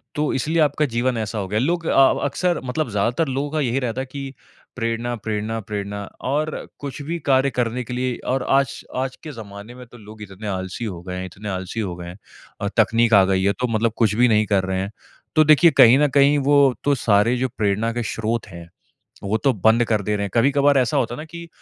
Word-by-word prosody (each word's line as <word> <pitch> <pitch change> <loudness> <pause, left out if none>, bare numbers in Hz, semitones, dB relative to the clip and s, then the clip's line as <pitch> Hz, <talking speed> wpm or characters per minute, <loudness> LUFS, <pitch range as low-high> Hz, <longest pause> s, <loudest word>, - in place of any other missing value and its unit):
तो 150 0 0
इसलिए 155 +6 0
आपका 150 0 +2
जीवन 120 +1 0
ऐसा 110 0 -3
हो 100 -2 -3
गया 105 +3 -1
है। 125 - +1
लोग 170 +1 -1
अ, 135 -1 +5
अक़्सर 175 +5 0
मतलब 130 +2 -2
ज़्यादातर 115 +9 0
लोगों 135 +2 -2
का 155 - -1
यही 130 -1 0
रहता 125 0 -3
है - - -4
कि 135 -1 -6 0.4
प्रेरणा-प्रेरणा-प्रेरणा 110 -3 -3 0.3
और 155 +2 -2
कुछ 145 +1 -6
भी 165 +4 -4
कार्य 135 0 +4
करने 125 -1 -2
के 120 - -7
लिए 125 0 -1 0.2
और 135 -1 -1
आज, 135 -2 +1
आज 130 0 -2
के 155 - -7
ज़माने 110 -1 -10
में 125 0 -11
तो 120 - -15
लोग 105 -1 -13
इतने 105 +1 -8
आलसी 95 +3 -4
हो 90 -6 -6
गए 90 0 -6
हैं 95 - -4
इतने 95 +4 -8
आलसी 95 +3 -4
हो 95 -5 -3
गए 85 0 -9
हैं 90 +2 -9 0.4
अ, 100 - -1
तक़नीक 115 +1 +3
आ 100 -2 +7
गई 95 0 +1
है 100 +1 +2
तो 125 - 0
मतलब 115 0 0
कुछ 110 -3 +2
भी 125 +2 +4
नहीं 110 -2 +3
कर 100 -2 +1
रहे 95 0 -2
हैं, 100 +2 -5 0.4
तो 155 - +6
देखिए 155 +2 +6
कहीं 120 +3 +8
न 150 - +4
कहीं, 140 +1 +4
वो 140 -1 +4
तो 145 0 +2
सारे 110 0 +2
जो 130 +1 0
प्रेरणा 105 +2 0
के 120 0 -2
स्रोत 110 +1 -3
हैं, 85 -3 -11 0.5
वो 100 +3 0
तो 135 +3 +2
बंद 110 +3 +3
कर 110 -2 0
दे 105 +2 -1
रहे 100 - -2
हैं। - - -5
कभी-कभार 140 +3 +3
ऐसा 125 -4 +1
होता 120 0 0
है - - -12
ना 150 - -6
कि 170 +1 -10
115 Hz, 235 wpm, -21 LUFS, 105-135 Hz, 0.5 s, कहीं